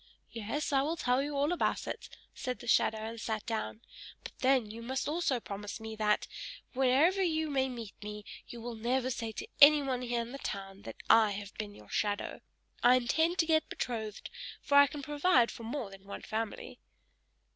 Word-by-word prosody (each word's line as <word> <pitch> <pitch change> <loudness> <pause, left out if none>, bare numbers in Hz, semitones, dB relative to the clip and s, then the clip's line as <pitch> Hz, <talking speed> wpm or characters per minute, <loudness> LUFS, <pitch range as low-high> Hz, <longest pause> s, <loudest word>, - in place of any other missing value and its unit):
"Yes, 235 +7 -3
I 270 - +5
will 310 +4 0
tell 250 -2 +2
you 285 0 -3
all 290 +4 +2
about 355 - 0
it," - - -6 0.2
said 250 -2 -4
the 245 - -11
shadow, 220 - +3
and 220 +1 -6
sat 220 -1 -3
down: 110 - -3 0.4
"but - - -7
then 260 -2 +3
you 230 +1 -8
must 260 +3 -2
also 300 -5 +1
promise 205 0 -6
me, 220 0 -6
that, 210 -1 +1 0.5
wherever 270 +9 +4
you 315 -4 +1
may 265 -1 +1
meet 230 -5 -7
me, 210 0 -7 0.2
you 235 - -8
will 240 +1 -5
never 250 +3 0
say 230 -2 -3
to 420 - -6
anyone 280 -3 +7
here 240 -1 -1
in 235 +1 -6
the 275 - -7
town 195 -3 -5
that - - -7
I 220 -2 +6
have 200 0 -7
been 205 -2 -6
your - - -15
shadow. 205 -1 -1 0.4
I 245 +1 +7
intend 320 +8 +2
to 330 - +3
get 315 -1 +2
betrothed, 220 -4 -4 0.3
for - - -4
I 285 0 +9
can 285 +1 -7
provide 290 -3 +3
for - - -10
more 235 -3 -4
than 195 0 -13
one 200 - -7
family." 220 -1 -4
245 Hz, 195 wpm, -32 LUFS, 220-280 Hz, 0.5 s, I